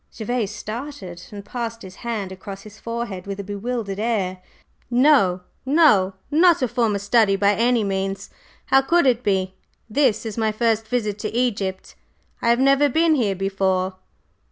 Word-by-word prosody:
Gervase 225 -1 -2
started, 215 -3 -7
and 200 -1 -9
passed 230 0 -5
his 190 0 -11
hand 220 -5 -4
across 195 +1 -9
his 215 0 -13
forehead 230 -5 -5
with 200 0 -5
a - - -3
bewildered 205 0 -4
air. 200 -5 -1 0.5
"No, 240 -8 +4 0.2
no! 265 - +4 0.2
Not 335 -1 +4
a - - +2
former 230 -3 0
study, 205 0 +3
by 200 +1 +3
any 235 +1 +2
means. 195 0 -3 0.3
How 270 - +4
could 340 +4 +2
it 245 -2 +3
be? 190 -2 0 0.3
This 230 -2 +1
is 220 0 -4
my 220 -1 +1
first 225 0 0
visit 215 -3 -2
to 215 +1 -4
Egypt. 200 -6 -1 0.5
I 235 - +1
have 235 +1 +4
never 275 +2 +4
been 320 +4 +3
here 220 -9 +1
before." 190 -1 -1
215 Hz, 160 wpm, -22 LUFS, 195-245 Hz, 0.5 s, No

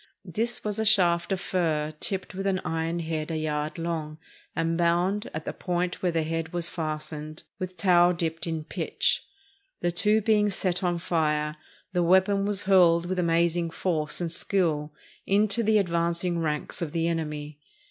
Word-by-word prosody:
This 230 +7 -2
was 210 0 -2
a - - +2
shaft 180 -5 +4
of 190 - 0
fir 155 -5 -1
tipped 190 -2 -2
with 195 +1 -3
an 190 -1 +1
iron 165 +1 -1
head 160 -1 -3
a 160 - -2
yard 150 0 -2
long, 160 -2 -3 0.4
and 165 0 0
bound, 175 +4 +1
at 155 0 -6
the - - -3
point 180 0 -2
where 180 - +1
the 165 -1 0
head 165 +1 -3
was 175 -1 0
fastened, 155 -1 -5 0.2
with 185 0 -5
tow 175 -1 +5
dipped 165 -1 -2
in 160 -2 -2
pitch. - - -1 0.6
The 175 - +1
two 210 +5 +3
being 210 -1 +3
set 185 -2 0
on 175 -1 +1
fire, 150 -3 0 0.4
the 180 - +2
weapon 190 +3 +3
was 205 -1 +1
hurled 175 -3 +5
with 185 +1 -2
amazing 170 0 +2
force 160 -3 0
and 170 -2 -2
skill 160 -5 0 0.4
into 205 +2 +3
the 220 -1 +3
advanc 170 -3 0
ing 175 -2 0
ranks 150 0 -2
of 160 -4 -3
the 165 0 +1
enemy. 150 -3 -3
170 Hz, 175 wpm, -27 LUFS, 160-185 Hz, 0.6 s, tow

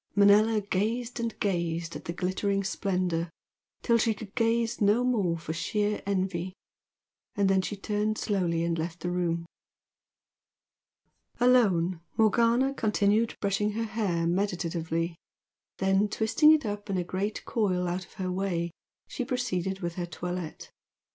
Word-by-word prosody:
Manella 210 +2 +5
gazed 225 +5 -2
and 230 -1 -3
gazed 170 -3 -1
at - - -8
the - - -3
glittering 190 +3 -1
splendour 180 -3 -1 0.5
till 235 -1 +3
she 225 -1 +2
could 200 -1 -10
gaze 230 0 +1
no 210 +4 +4
more 205 -9 +1
for 160 -1 -5
sheer 205 +6 -1
envy, 185 -2 -1 0.8
and 200 -1 +2
then 190 0 +3
she 205 - -4
turned 210 +1 -1
slowly 175 -5 0
and 170 -1 -1
left 165 +1 -4
the 175 - -2
room. 170 -1 -1 1.9
Alone, 190 -9 +3 0.2
Morgana 235 +4 +3
continued 215 -1 +1
brushing 205 +1 0
her 230 +2 -1
hair 205 -7 -1
meditatively, 170 -2 -1 0.6
then, 195 +2 +2
twisting 225 +9 +4
it 310 -4 +3
up 205 0 -4
in 195 - 0
a 180 - 0
great 190 +4 -3
coil 185 -5 0
out 180 +2 -2
of - - -18
her 185 -3 -3
way, 180 -2 -1 0.4
she 255 - -3
proceeded 195 -7 -2
with 170 -1 -2
her 175 -1 -2
toilette. 175 -1 -6
195 Hz, 140 wpm, -28 LUFS, 175-215 Hz, 1.9 s, Manella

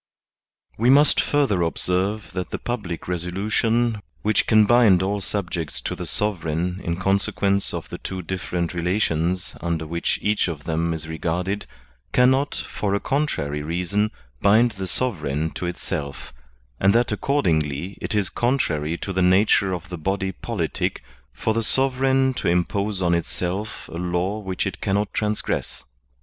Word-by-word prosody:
We 120 +3 +4
must 145 +3 +6
further 135 -11 +2
observe 90 +5 -1
that 90 -1 -3
the - - -3
public 105 -9 -4
resolution 105 +6 0 0.2
which 110 0 +2
can 110 -2 +6
bind 105 -5 +5
all 100 +1 -1
subjects 90 -5 -3
to - - -3
the - - -5
sovereign 90 -2 -1
in 85 - -1
conse 95 +2 +1
quence 100 0 +1
of - - -5
the - - -6
two 95 -1 -5
different 90 -1 -2
relations 90 0 0
under 85 -2 -1
which 85 +2 -1
each 105 -1 +2
of 80 -4 -5
them 80 +1 0
is 80 -1 -4
regarded 90 +5 -2 0.5
cannot, 130 +3 +4
for 100 -1 -2
a - - +1
contrary 80 - -1
reason, 90 +7 0 0.3
bind 110 +4 +5
the 95 -3 -5
sovereign 80 - -1
to 90 - -4
itself; 80 -5 -5 0.5
and 100 +2 +4
that 120 -1 +3
accordingly 90 - 0
it - - -2
is 100 -3 +2
con 125 +3 +1
trary 75 - -1
to 95 - -3
the 95 - +1
nature 95 +1 +4
of 90 -1 -4
the 90 -2 -6
body 95 +3 -1
politic 95 -4 -3 0.3
for 85 - -1
the 115 - +1
sovereign 130 +2 +2
to - - -3
impose 95 +3 +1
on 85 -1 +3
itself 90 +4 -3
a 85 - -4
law 90 +4 -1
which 95 -2 -3
it 95 -1 -4
cannot 100 +1 0
transgress. 105 - -2
95 Hz, 155 wpm, -23 LUFS, 85-105 Hz, 0.5 s, must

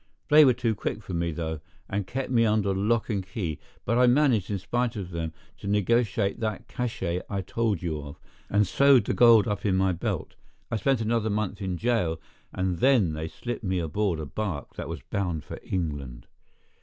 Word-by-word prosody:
They 150 0 +8
were 130 -3 +5
too 120 -2 0
quick 105 +1 -4
for 95 - -7
me, 85 0 0
though, 80 -1 -3 0.3
and 100 -2 -2
kept 130 0 -3
me 115 -2 +4
under 105 -3 +2
lock 110 +4 +1
and 100 -3 -1
key; 90 -5 -4 0.3
but 115 +3 +2
I 125 - +6
managed, 125 -6 +3
in 100 - -1
spite 120 +6 -1
of 95 -4 -5
them, 85 -1 -3 0.3
to 100 - -7
negotiate 105 0 +1
that 110 -3 -3
cach├® 95 -8 -2
I 100 -1 -2
told 105 -2 -1
you 80 -3 -2
of, 70 0 -10 0.3
and 105 +1 +3
sewed 135 +3 +5
the - - 0
gold 115 -4 +6
up 105 -1 -2
in 100 -3 +2
my 95 0 +3
belt. 85 - -3 0.4
I 115 - +1
spent 125 +3 +1
another 110 0 0
month 105 -1 -2
in 95 -2 -2
jail, 105 -7 0 0.3
and 95 -2 -1
then 120 -11 +4
they 80 +1 -4
slipped 120 +8 -6
me 95 -2 0
aboard 85 +2 0
a 80 - -4
bark 90 -2 -4
that - - -5
was - - -6
bound 90 -6 -2
for - - -8
England. 70 -9 -4
100 Hz, 200 wpm, -27 LUFS, 90-115 Hz, 0.4 s, They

